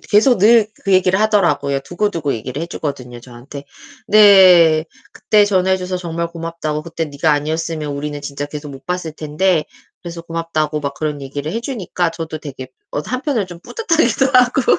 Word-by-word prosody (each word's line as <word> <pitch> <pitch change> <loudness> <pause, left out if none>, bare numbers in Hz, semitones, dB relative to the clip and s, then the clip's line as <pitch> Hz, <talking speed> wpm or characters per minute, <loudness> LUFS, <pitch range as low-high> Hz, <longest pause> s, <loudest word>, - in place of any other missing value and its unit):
계속 220 +2 +3
늘 220 +1 +5 0.2
그 195 - +1
얘기를 185 0 +3
하더라고요. 170 -10 +1
두고두고 175 -4 -2
얘기를 130 +7 -5
해 - - -3
주거든요 130 -7 -6
저한테. 130 +4 -11 0.4
네. 185 -6 +6 0.3
그때 210 -1 +3
전화해 190 -2 +2
줘서 185 0 -4
정말 170 -1 -4
고맙다고. 165 -2 -5
그때 165 0 -4
네가 150 +2 0
아니었으면 155 +1 -2
우리는 145 0 -5
진짜 145 0 -5
계속 150 0 -8
못 135 0 -12
봤을 180 -3 -3
텐데 155 +3 0 0.4
그래서 170 -1 -8
고맙다고 165 -2 -2
막 140 -1 -4
그런 150 -2 -3
얘기를 145 +3 -5
해 230 - -2
주니까 190 -9 -2
저도 160 -1 -6
되게 135 -4 -9 0.2
어 - - -1
한편으로는 255 - -2
좀 175 -1 -10
뿌듯하기도 330 - +1
하고 250 +4 +4
165 Hz, 395 characters per minute, -18 LUFS, 150-190 Hz, 0.4 s, 네